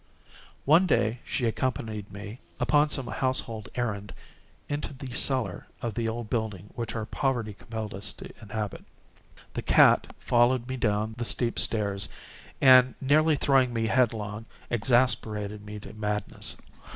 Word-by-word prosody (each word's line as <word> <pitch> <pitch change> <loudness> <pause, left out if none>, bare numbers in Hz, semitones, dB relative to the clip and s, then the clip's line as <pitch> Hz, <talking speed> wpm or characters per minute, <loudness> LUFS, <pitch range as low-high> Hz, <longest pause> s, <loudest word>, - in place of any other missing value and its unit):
One 165 +6 +5
day 115 -6 +1
she 125 - -2
accompanied 110 -3 -2
me, 105 +4 -8 0.2
upon 150 0 +3
some 135 -3 -3
household 120 -4 -1
errand, 105 -5 -3 0.5
into 145 0 -3
the 130 -1 -8
cellar 130 0 +1
of 120 -3 -3
the 115 +1 -1
old 115 0 -4
building 105 -4 -3
which 115 -2 -4
our 110 -1 -2
poverty 120 -4 -1
compelled 110 +1 -6
us 100 +1 -2
to - - -11
inhabit. 105 -1 -5 0.7
The - - -3
cat - - +5
followed 120 0 +2
me 130 - -3
down 110 -2 0
the - - -1
steep 120 0 0
stairs, 100 -2 +2 0.5
and, 130 -1 +7
nearly 155 +3 +3
throwing 135 -3 +3
me 115 -1 0
headlong, 110 -3 0 0.2
exasperated 110 -3 +1
me 105 0 -8
to - - -10
madness. 105 -1 -3
115 Hz, 140 wpm, -27 LUFS, 105-130 Hz, 0.7 s, and